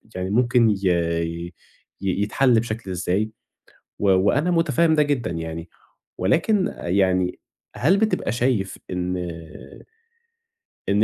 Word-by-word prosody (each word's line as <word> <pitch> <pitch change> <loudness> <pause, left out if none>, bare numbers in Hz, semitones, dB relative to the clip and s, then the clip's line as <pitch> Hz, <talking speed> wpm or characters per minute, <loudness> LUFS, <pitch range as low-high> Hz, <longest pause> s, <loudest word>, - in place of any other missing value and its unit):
يعني 90 0 -3
ممكن 120 +1 +3
ي 105 - +2 1.3
ي 95 0 -1
يتحَل 115 +3 +3
بشكل 110 -3 -4
إزاي 90 +4 -1 0.7
و 100 - +2
وأنا 105 - +3
مُتفهم 165 -1 +3
ده 150 - +4
جدًا 135 -8 -1
يعني. 80 0 -5 0.5
ولكن 180 - +1
يعني 90 0 +1 0.4
هل 170 +10 +3
بتبقى 215 +1 0
شايف 120 -5 0
إن 90 0 -2 1.7
إن 100 +2 +3
110 Hz, 110 wpm, -23 LUFS, 95-140 Hz, 1.7 s, ده